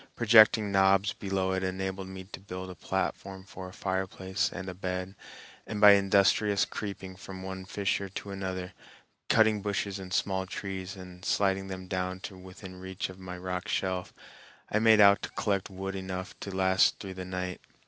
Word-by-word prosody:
Projecting 110 Hz, -2 st, +6 dB
knobs 95 Hz, +1 st, +4 dB
below 95 Hz, -1 st, -1 dB
it 95 Hz, 0 st, 0 dB
enabled 95 Hz, 0 st, -3 dB
me 95 Hz, 0 st, -8 dB
to 95 Hz, -, -10 dB
build 95 Hz, -1 st, -7 dB
a -, -, -7 dB
platform 95 Hz, +2 st, -3 dB
for 95 Hz, -1 st, -9 dB
a -, -, -12 dB
fireplace 95 Hz, 0 st, -2 dB
and 95 Hz, 0 st, -6 dB
a 90 Hz, -, -4 dB
bed, 90 Hz, 0 st, -4 dB, 0.5 s
and 110 Hz, -, -4 dB
by 105 Hz, -1 st, +10 dB
industrious 100 Hz, +1 st, +4 dB
creeping 95 Hz, -2 st, -6 dB
from 95 Hz, 0 st, -9 dB
one 95 Hz, 0 st, -6 dB
fissure 100 Hz, 0 st, -1 dB
to 100 Hz, +1 st, -6 dB
another, 95 Hz, -2 st, -4 dB, 0.6 s
cutting 110 Hz, -2 st, +4 dB
bushes 100 Hz, -1 st, -2 dB
and 95 Hz, -1 st, -8 dB
small 95 Hz, 0 st, 0 dB
trees 95 Hz, +1 st, -5 dB
and 90 Hz, -1 st, -11 dB
sliding 95 Hz, -1 st, +1 dB
them 95 Hz, -1 st, -6 dB
down 95 Hz, 0 st, -2 dB
to 95 Hz, -, -7 dB
within 95 Hz, 0 st, -11 dB
reach 95 Hz, 0 st, -4 dB
of 95 Hz, 0 st, -11 dB
my 90 Hz, -1 st, -7 dB
rock 90 Hz, +2 st, -4 dB
shelf, 95 Hz, -3 st, -1 dB, 0.6 s
I 110 Hz, -, +3 dB
made 110 Hz, -1 st, +6 dB
out 100 Hz, 0 st, +7 dB
to -, -, -4 dB
collect 100 Hz, -2 st, -1 dB
wood 95 Hz, 0 st, -5 dB
enough 95 Hz, -1 st, -5 dB
to -, -, -6 dB
last 95 Hz, 0 st, +3 dB
through 95 Hz, -2 st, -7 dB
the 95 Hz, 0 st, -6 dB
night. 90 Hz, 0 st, -4 dB
95 Hz, 180 wpm, -29 LUFS, 95-100 Hz, 0.6 s, by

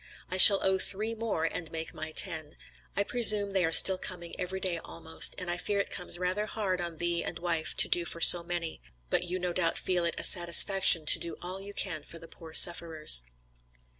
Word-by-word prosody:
I 185 Hz, -, -5 dB
shall 195 Hz, +1 st, +7 dB
owe 190 Hz, 0 st, -2 dB
three 215 Hz, +4 st, -1 dB
more, 215 Hz, -8 st, -6 dB
to 165 Hz, -1 st, -10 dB
make 160 Hz, +1 st, -9 dB
my 155 Hz, -1 st, -9 dB
ten. 155 Hz, -1 st, -1 dB, 0.4 s
I 200 Hz, -, -2 dB
presume 210 Hz, -3 st, +2 dB
they 190 Hz, -2 st, -3 dB
are 165 Hz, -, -4 dB
still 185 Hz, +3 st, +9 dB
coming 175 Hz, -2 st, -11 dB
every 185 Hz, +1 st, -7 dB
day 180 Hz, -3 st, -5 dB
almost, 160 Hz, 0 st, -1 dB
and 180 Hz, -, -8 dB
I 175 Hz, 0 st, -6 dB
fear 200 Hz, +2 st, -5 dB
it 200 Hz, -, -6 dB
comes 180 Hz, -1 st, -4 dB
rather 185 Hz, +4 st, -6 dB
hard 195 Hz, -5 st, -6 dB
on 170 Hz, -2 st, -9 dB
thee 170 Hz, 0 st, -4 dB
and 165 Hz, -, -9 dB
wife 165 Hz, -2 st, -6 dB
to -, -, +4 dB
do 175 Hz, -, -2 dB
for 170 Hz, -, -6 dB
so 175 Hz, +1 st, +7 dB
many; 170 Hz, -, -9 dB, 0.3 s
but -, -, -2 dB
you 180 Hz, +1 st, -7 dB
no 180 Hz, -1 st, -7 dB
doubt 170 Hz, -2 st, -4 dB
feel 180 Hz, -2 st, -4 dB
it 170 Hz, -, -4 dB
a -, -, -6 dB
satisfaction 175 Hz, -1 st, +3 dB
to -, -, +3 dB
do 170 Hz, -, -9 dB
all 185 Hz, +2 st, -9 dB
you 200 Hz, +1 st, -13 dB
can 170 Hz, -6 st, -4 dB
for 165 Hz, -, -15 dB
the 165 Hz, -, -15 dB
poor 160 Hz, 0 st, -17 dB
sufferers." 160 Hz, -, +3 dB
175 Hz, 220 wpm, -25 LUFS, 165-190 Hz, 0.4 s, still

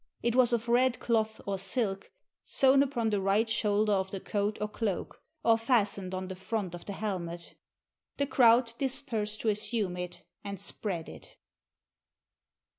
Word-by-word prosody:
It 235 Hz, 0 st, +1 dB
was 250 Hz, -2 st, +5 dB
of 235 Hz, 0 st, 0 dB
red 245 Hz, 0 st, +3 dB
cloth 220 Hz, -2 st, 0 dB
or 195 Hz, -1 st, -2 dB
silk, 195 Hz, -1 st, -2 dB, 0.3 s
sewn 270 Hz, 0 st, +4 dB
upon 240 Hz, -5 st, 0 dB
the 205 Hz, -2 st, +1 dB
right 200 Hz, +4 st, +2 dB
shoulder 210 Hz, -1 st, +1 dB
of 190 Hz, -1 st, 0 dB
the 195 Hz, -, -5 dB
coat 205 Hz, +2 st, -1 dB
or 210 Hz, -, -1 dB
cloak, 210 Hz, -3 st, -3 dB, 0.2 s
or 230 Hz, -1 st, +4 dB
fas 225 Hz, -3 st, +3 dB
tened 185 Hz, -1 st, -5 dB
on 185 Hz, 0 st, -4 dB
the 190 Hz, -, -6 dB
front 190 Hz, -1 st, -3 dB
of 175 Hz, -, -8 dB
the 200 Hz, -, -5 dB
hehnet. 175 Hz, -5 st, -4 dB, 0.6 s
The 280 Hz, -, +1 dB
crowd 240 Hz, -3 st, +4 dB
dispersed 225 Hz, -6 st, -1 dB
to 225 Hz, -, +1 dB
assume 210 Hz, -2 st, -1 dB
it 180 Hz, 0 st, -6 dB, 0.2 s
and 200 Hz, -2 st, -5 dB
spread 190 Hz, -4 st, -4 dB
it. -, -, -12 dB
210 Hz, 165 wpm, -30 LUFS, 195-235 Hz, 0.6 s, was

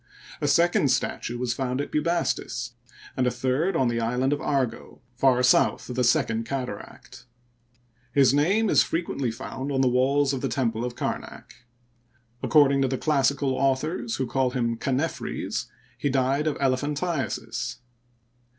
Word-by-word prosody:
A 145 Hz, -, +1 dB
second 165 Hz, -1 st, +3 dB
statue 125 Hz, -2 st, -1 dB
was 120 Hz, -1 st, -1 dB
found 130 Hz, +1 st, -2 dB
at 145 Hz, -, -3 dB
Bubastis, 150 Hz, -6 st, -1 dB, 0.4 s
and 130 Hz, -1 st, +1 dB
a -, -, +4 dB
third 130 Hz, +9 st, 0 dB
on 130 Hz, -5 st, +2 dB
the 120 Hz, 0 st, 0 dB
island 125 Hz, +4 st, +1 dB
of 145 Hz, -, -3 dB
Argo, 135 Hz, -5 st, -2 dB, 0.2 s
far 125 Hz, 0 st, +3 dB
south 125 Hz, -, +3 dB
of -, -, -5 dB
the 125 Hz, -, +1 dB
Second 115 Hz, -1 st, +2 dB
Cataract. 125 Hz, -4 st, -7 dB, 0.9 s
His 135 Hz, -2 st, +4 dB
name 190 Hz, +10 st, +2 dB
is -, -, +5 dB
frequently 150 Hz, -6 st, -1 dB
found 130 Hz, +4 st, -5 dB
on 135 Hz, -1 st, +1 dB
the 130 Hz, -, +3 dB
walls 135 Hz, +3 st, +2 dB
of 130 Hz, -, -3 dB
the 135 Hz, -, -1 dB
temple 115 Hz, -2 st, -1 dB
of 125 Hz, 0 st, -4 dB
Kamak. -, -, -5 dB, 0.9 s
According 140 Hz, -3 st, +4 dB
to 135 Hz, -, +2 dB
the 130 Hz, 0 st, -2 dB
classical 140 Hz, -2 st, +1 dB
authors, 145 Hz, -, 0 dB
who 130 Hz, -, -1 dB
call 130 Hz, +1 st, 0 dB
him 120 Hz, -2 st, -1 dB
Chanephres, 135 Hz, +7 st, -2 dB, 0.3 s
he 145 Hz, -, 0 dB
died 135 Hz, +3 st, +1 dB
of 155 Hz, -, -1 dB
elephantiasis. 140 Hz, -3 st, -2 dB
135 Hz, 150 wpm, -25 LUFS, 125-145 Hz, 0.9 s, is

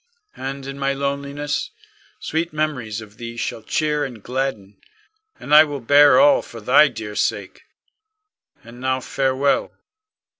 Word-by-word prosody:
And 135 Hz, 0 st, -6 dB
in 135 Hz, 0 st, -7 dB
my 140 Hz, 0 st, 0 dB
loneliness, 140 Hz, +1 st, -3 dB, 0.5 s
sweet 165 Hz, +2 st, -2 dB
memories 135 Hz, -9 st, -3 dB
of 105 Hz, 0 st, -14 dB
thee 115 Hz, 0 st, -8 dB
shall 115 Hz, -, -4 dB
cheer 150 Hz, +5 st, -1 dB
and 120 Hz, -7 st, -7 dB
gladden, 125 Hz, -6 st, -4 dB, 0.6 s
and 145 Hz, -, -4 dB
I 155 Hz, +1 st, +10 dB
will 145 Hz, -2 st, -5 dB
bear 145 Hz, -, +6 dB
all 285 Hz, 0 st, +5 dB
for -, -, -11 dB
thy -, -, +5 dB
dear -, -, -7 dB
sake. -, -, -2 dB, 1.0 s
And 120 Hz, +1 st, -13 dB
now 130 Hz, 0 st, 0 dB
farewell. 135 Hz, +1 st, 0 dB
135 Hz, 140 wpm, -21 LUFS, 125-145 Hz, 1.0 s, I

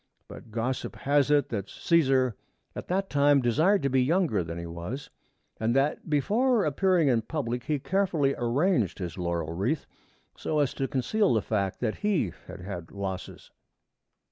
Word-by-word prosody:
But -, -, -11 dB
gossip 120 Hz, +4 st, -3 dB
has 145 Hz, 0 st, +2 dB
it 145 Hz, -1 st, +3 dB
that 100 Hz, -3 st, -3 dB
Cæsar 135 Hz, -, +2 dB, 0.4 s
at -, -, -6 dB
that 195 Hz, +2 st, 0 dB
time 145 Hz, -2 st, +4 dB
desired 155 Hz, -, +2 dB
to 140 Hz, -, +2 dB
be 130 Hz, 0 st, +3 dB
younger 150 Hz, -, +2 dB
than 85 Hz, +1 st, -6 dB
he 85 Hz, -, -5 dB
was, 85 Hz, +11 st, -6 dB, 0.5 s
and 115 Hz, +2 st, +1 dB
that 140 Hz, +4 st, 0 dB
before 215 Hz, -, +2 dB
appearing 170 Hz, +2 st, +2 dB
in 120 Hz, -4 st, +3 dB
public 125 Hz, -2 st, -3 dB
he 150 Hz, -2 st, 0 dB
carefully 160 Hz, -3 st, +1 dB
arranged 120 Hz, -, +1 dB
his 90 Hz, -3 st, -5 dB
laurel 85 Hz, -2 st, -2 dB
wreath 110 Hz, -, -1 dB, 0.5 s
so 155 Hz, -, -2 dB
as 145 Hz, -3 st, +2 dB
to 135 Hz, -, -2 dB
conceal 185 Hz, -, +1 dB
the 110 Hz, -, +1 dB
fact 100 Hz, -4 st, -2 dB
that 110 Hz, -3 st, -1 dB
he 190 Hz, -, 0 dB
had -, -, -9 dB
had 90 Hz, -3 st, -6 dB
losses. 95 Hz, -2 st, -6 dB
135 Hz, 165 wpm, -27 LUFS, 105-155 Hz, 0.5 s, time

